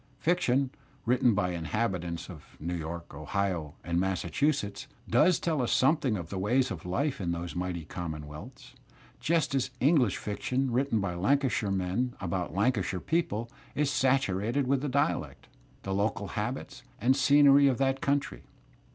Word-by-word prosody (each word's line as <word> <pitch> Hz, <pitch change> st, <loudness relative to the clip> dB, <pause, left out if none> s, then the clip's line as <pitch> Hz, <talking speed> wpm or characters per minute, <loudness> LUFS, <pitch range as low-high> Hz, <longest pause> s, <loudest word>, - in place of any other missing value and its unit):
Fiction, 140 Hz, -4 st, +1 dB, 0.3 s
written 120 Hz, -1 st, +3 dB
by 90 Hz, -3 st, +1 dB
inhabitants 85 Hz, -1 st, -2 dB
of 80 Hz, -5 st, -13 dB
New 85 Hz, +3 st, -3 dB
York, 85 Hz, 0 st, -5 dB
Ohio, 80 Hz, +1 st, -2 dB
and 85 Hz, 0 st, 0 dB
Massachusetts, 105 Hz, -, -1 dB, 0.2 s
does 180 Hz, -2 st, +4 dB
I -, -, -20 dB
tell 160 Hz, -5 st, +1 dB
us 120 Hz, -, 0 dB
something 135 Hz, -4 st, +3 dB
of 85 Hz, -3 st, -7 dB
the 95 Hz, -, -3 dB
ways 125 Hz, +7 st, +2 dB
of 90 Hz, -1 st, -6 dB
life 140 Hz, +7 st, -1 dB
in 85 Hz, -2 st, -1 dB
those 85 Hz, +1 st, -5 dB
mighty 90 Hz, -2 st, -3 dB
common 80 Hz, -2 st, -5 dB
' -, -, -9 dB
wealths, 75 Hz, +1 st, -11 dB, 0.5 s
just 165 Hz, -3 st, +1 dB
as 135 Hz, -2 st, +1 dB
English 130 Hz, -, +3 dB
fiction 125 Hz, +5 st, -2 dB
written 125 Hz, -2 st, +1 dB
by 95 Hz, -3 st, -2 dB
Lancashire 120 Hz, +3 st, +1 dB
men 95 Hz, +7 st, -1 dB
about 90 Hz, -1 st, -3 dB
Lancashire 100 Hz, -3 st, +1 dB
people 120 Hz, -, -1 dB, 0.2 s
is 145 Hz, -1 st, +1 dB
saturated 130 Hz, -1 st, +1 dB
with 135 Hz, +1 st, +1 dB
the 145 Hz, -, -2 dB
dialect, 140 Hz, +2 st, -1 dB, 0.4 s
the 95 Hz, -, -3 dB
local 100 Hz, 0 st, -1 dB
habits 120 Hz, +5 st, -4 dB, 0.2 s
and 125 Hz, +4 st, +3 dB
scenery 140 Hz, +1 st, +6 dB
of 130 Hz, -3 st, +2 dB
that 135 Hz, 0 st, +1 dB
coimty. 140 Hz, -, 0 dB
110 Hz, 160 wpm, -29 LUFS, 90-135 Hz, 0.5 s, scenery